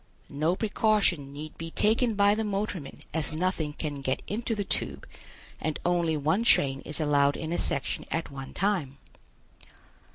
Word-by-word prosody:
No 155 +5 +1
precaution 205 -9 +2
need 150 +2 -8
be 165 0 -4
taken 225 +5 +2
by 200 0 +5
the 220 +1 0
motorman 200 -7 -3
as 160 -1 +1
nothing 160 -2 -1
can 145 -2 -4
get 130 -1 -1
into 225 +2 -2
the 205 - -1
tube 70 - -3 0.6
and 155 -1 -1
only 170 -3 +2
one 155 +8 +2
train 135 -12 +4
is 150 - -3
allowed 145 -2 +3
in 160 +1 -3
a - - 0
section 140 - -1
at 165 -2 -2
one 135 -1 -7
time. 175 -9 0
160 Hz, 160 wpm, -28 LUFS, 145-205 Hz, 0.6 s, by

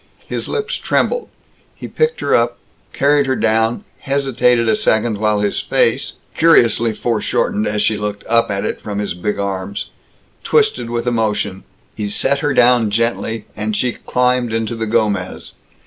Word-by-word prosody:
His - - -4
lips 440 +2 -2
trembled. 485 - 0 0.5
He - - -8
picked 470 +1 0
her - - 0
up, - - +2 0.3
carried 145 0 +2
her 130 - +1
down, 110 +1 +1 0.2
hesitated 130 -4 +1
a 110 - +3
second 110 0 +1
while 105 -1 +1
his 100 -1 0
face - - +1 0.2
curiously 120 -8 +4
foreshortened 110 -1 -1
as 105 0 0
she 110 - +1
looked 105 -1 -4
up 115 0 +2
at 100 -1 -2
it - - -3
from 105 -1 -5
his 105 -3 -2
big 105 +4 -3
arms 100 0 -4 0.5
twisted 435 - +1
with 120 0 -2
emotion. 105 -5 -1 0.3
He 105 -2 -4
set 140 +6 +1
her 145 - 0
down 120 -2 +4
gently, 115 0 -1
and 110 0 -2
she 125 +2 +1
climbed 125 -1 0
into 115 0 -1
the 115 -1 -3
Gomez. 105 -5 -1
115 Hz, 160 wpm, -18 LUFS, 105-125 Hz, 0.5 s, curiously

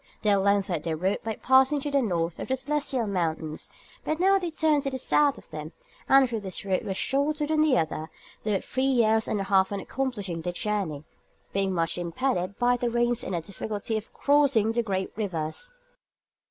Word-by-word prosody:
They 210 - +3
had 200 - +5
lengthened 195 -4 +1
their 160 -1 -2
route 190 +5 -1
by 220 -1 -3
passing 265 +3 +4
to 290 - -3
the 280 -1 +3
north 170 -7 -1
of - - -4
the 260 - +1
celestial 270 -3 -1
mountains, 160 -5 -2 0.3
but 310 +1 -2
now 390 +2 +4
they 355 -2 -3
turned 315 -2 +2
to 275 - -2
the 265 - -4
south 285 +2 +3
of - - -15
them, 155 +1 -7 0.4
and 270 -1 +7
though 230 -2 -3
this 190 -1 -5
route 190 -2 0
was 190 -1 -3
shorter 295 +2 0
than 310 +1 +1
the 300 -5 +4
other, 160 0 -2 0.3
they 215 - 0
were 195 - +1
three 260 - -3
years 225 -4 +3
and 210 - -1
a - - -1
half 190 0 +3
in 200 - -2
accomplishing 205 -9 -3
their 175 +2 -3
journey, 185 -8 -2 0.5
being 195 -1 +1
much 165 -1 0
impeded 185 +1 -1
by 245 0 +3
the 245 0 -1
rains 240 0 +1
and 185 - -3
the 170 - -1
difficulty 210 +4 -4
of 220 0 -4
crossing 280 -7 +3
the 235 +1 +1
great 190 -4 -2
rivers. 200 - -3
215 Hz, 205 wpm, -27 LUFS, 185-265 Hz, 0.5 s, and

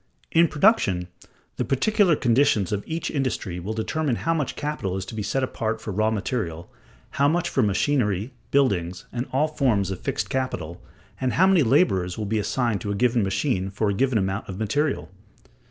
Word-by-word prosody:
In 170 +1 +5
production, 145 - +2 0.5
the - - 0
particular 180 - +3
conditions 120 -7 +2
of 100 -1 -1
each 165 +1 -3
industry 125 - -2
will 100 +5 -4
determine 135 +4 -1
how 165 +7 0
much 150 -5 -2
capital 145 -11 -3
is 95 - -4
to 95 - -9
be 110 - -3
set 130 +6 -1
apart 115 -3 -2
for 105 - -6
raw 110 +3 +2
material, 100 -6 -3 0.4
how 140 - +2
much 170 +3 +1
for 135 - +1
machinery, 105 0 +1 0.2
buildings, 90 -10 +1
and 120 +2 -3
all 145 +4 +2
forms 120 -11 +1
of 95 - -4
fixed - - -2
capital, 90 -11 -3 0.4
and 130 -1 0
how 185 - +4
many 190 -3 +5
laborers 110 - +2
will 110 - -3
be 110 +2 0
assigned 115 0 0
to 100 - -4
a 100 - -1
given 120 +2 +2
machine 95 0 0
for 105 +1 0
a - - -1
given 130 +3 +1
amount 95 +1 -2
of 95 - -5
material. 110 - -1
115 Hz, 185 wpm, -24 LUFS, 95-140 Hz, 0.5 s, In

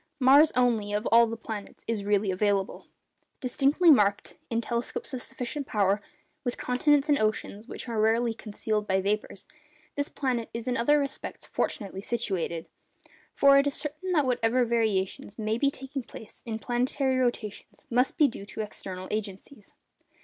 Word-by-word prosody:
Mars 280 +4 +7
only, 230 -5 +2
of 210 +2 -1
all 230 0 +7
the 230 0 -5
planets, 220 -2 -8
is 225 -3 -1
really 205 -1 +1
available. 195 0 0 0.5
Distinctly 280 +6 +4
marked 205 -7 +3
(in 230 - 0
telescopes 240 - -3
of 255 - -3
sufficient 260 +4 -5
power) 200 -1 +1 0.4
with 245 -2 -2
continents 280 +3 +2
and 290 -2 +3
oceans, 215 0 -2
which - - -7
are 225 -2 -1
rarely 225 +2 +2
concealed 215 -1 -3
by 190 0 +2
vapours, 200 0 -2 0.5
this 285 0 -2
planet 250 -4 -2
is 230 +1 -5
in 250 - 0
other 275 +6 +3
respects 280 -2 -4
fortunately 195 -5 -3
situated. 190 -8 -2 0.7
For 275 0 +6
it 280 - +2
is 280 - -1
certain 305 +5 -2
that 300 -5 +3
whatever 245 0 +2
variations 215 -4 -1
may 220 +1 -1
be 280 - +3
taking 270 0 -6
place 225 -2 -12
in 220 -1 -2
planetary 255 +3 0
rotations 240 -4 -3
must 250 +2 +2
be 300 - +6
due 200 -5 -8
to 220 - -5
external 185 -3 -7
agencies. 210 +2 -6
230 Hz, 160 wpm, -28 LUFS, 210-265 Hz, 0.7 s, Mars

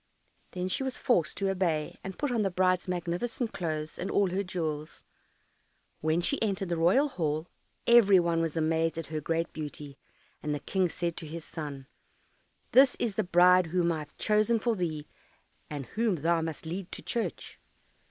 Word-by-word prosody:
Then 180 0 -2
she 185 - -1
was 265 -1 -2
forced 180 - +1
to 195 -1 0
obey, 170 -5 -1
and 190 -1 -6
put 290 -3 -1
on 235 -3 +1
the 195 - +1
bride's 185 0 +1
magnificent 180 +7 -2
clothes 155 -3 -3
and 190 - -3
all 195 -3 +2
her 190 +2 0
jewels. 160 -5 -4 1.0
When 160 +2 +1
she 280 - 0
entered 195 -4 -1
the 170 - 0
royal 180 - +4
hall, 155 - -2 0.4
every 210 -5 +7
one 170 -1 +1
was 165 -1 -2
amazed 160 +1 +1
at 165 - -3
her 155 - -1
great 165 +2 -1
beauty, 150 -2 -7 0.4
and 150 0 -1
the - - -4
King 185 +2 0
said 170 -1 -3
to 160 - -5
his 165 +1 -7
son, 145 -4 -6 0.9
"This 265 0 +6
is 230 -4 -1
the - - 0
bride 180 0 +5
whom 170 0 +1
I 160 - -1
have 150 0 -10
chosen 215 +2 +2
for 230 +1 0
thee, 160 -5 -3 0.6
and 145 -3 -5
whom 220 - 0
thou 165 +2 +1
must 160 -1 -5
lead 175 +3 -5
to - - -6
church." 235 - -3
175 Hz, 180 wpm, -29 LUFS, 160-195 Hz, 1.0 s, every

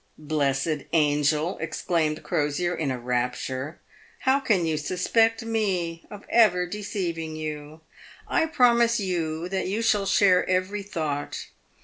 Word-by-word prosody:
" - - -41
Blessed 145 0 -1
angel!" 150 +2 +2
exclaimed 155 -1 -1
Crosier, 150 +4 0
in 160 -4 -2
a 130 - -2
rapture, 125 +4 -3 0.2
" - - -27
how 265 +1 +4
can 210 -10 +1
you 160 -1 0
suspect 225 +9 +1
me 185 -7 -1
of 205 -1 -10
ever 185 -6 +4
deceiving 175 -5 -4
you? 155 0 -6 0.5
I 320 - +1
promise 235 -5 +4
you 170 -4 -2
that 190 -1 -2
you 210 +4 -1
shall 205 -3 +2
share 190 -2 +4
every 185 +3 0
thought. 155 -7 -4
170 Hz, 135 wpm, -25 LUFS, 150-205 Hz, 0.5 s, how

